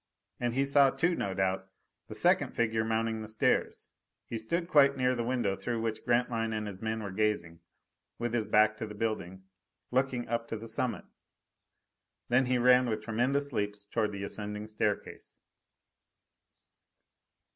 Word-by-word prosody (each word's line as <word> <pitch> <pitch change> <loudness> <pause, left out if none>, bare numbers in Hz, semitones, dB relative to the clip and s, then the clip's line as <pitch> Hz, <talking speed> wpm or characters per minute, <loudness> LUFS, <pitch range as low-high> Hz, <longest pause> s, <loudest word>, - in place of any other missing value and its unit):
And 120 -1 -1
he 135 +1 +2
saw 140 0 +5
too, 175 +6 +1
no 100 - -2
doubt, 95 0 -1 0.4
the - - -8
second - - +2
figure 110 -1 +1
mounting 110 0 -1
the 110 - -6
stairs. 110 0 0 0.3
He - - -6
stood 170 +10 -2
quite 140 -5 +5
near 130 0 +2
the 120 -2 -2
window 120 -5 0
through 115 +4 -3
which 115 -1 -3
Grantline 120 -2 +1
and 110 0 -2
his 100 -2 -7
men 110 0 -2
were 100 - -5
gazing, 95 -5 -1 0.6
with 120 0 -3
his 115 -3 0
back 110 0 +4
to 110 - -4
the 105 - -9
building, 100 -4 -3 0.5
looking 125 -1 0
up 115 0 -2
to 115 - -4
the 115 +2 -9
summit. 115 +2 -2 1.2
Then 125 +2 +4
he 125 0 +2
ran 125 0 +5
with 110 -1 -2
tremendous 130 +5 0
leaps 105 -1 -2
toward 105 0 -1
the 100 -1 -5
ascending 105 +1 -4
staircase. 105 -1 -3
115 Hz, 160 wpm, -30 LUFS, 105-125 Hz, 1.2 s, saw